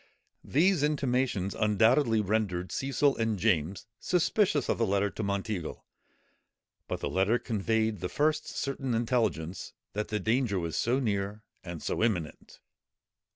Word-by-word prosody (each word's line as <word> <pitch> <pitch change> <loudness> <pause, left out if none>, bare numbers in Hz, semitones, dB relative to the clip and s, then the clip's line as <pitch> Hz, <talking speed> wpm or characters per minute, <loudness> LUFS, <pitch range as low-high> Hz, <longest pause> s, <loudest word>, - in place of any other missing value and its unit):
These 175 +3 +3
intimations 130 -9 0
undoubtedly 110 +3 +3
rendered 100 -3 -1
Cecil 135 +1 +1
and 115 -2 0
James 90 -2 0
suspicious 180 - +1
of - - 0
the 115 - +2
letter 100 +1 +1
to - - -5
Monteagle; 100 -3 -3 1.0
but - - -4
the - - -1
letter 95 +5 +2
conveyed 110 -2 0
the 90 - -3
first 155 +1 +1
certain 135 -3 -2
intelligence 110 - -1 0.2
that 105 +1 -2
the 105 - -2
danger 110 -2 +1
was 85 -3 -3
so 125 +3 +1
near 105 -3 -2 0.2
and 85 -3 -7
so - - -2
imminent. 90 -9 -2
110 Hz, 135 wpm, -29 LUFS, 100-130 Hz, 1.0 s, These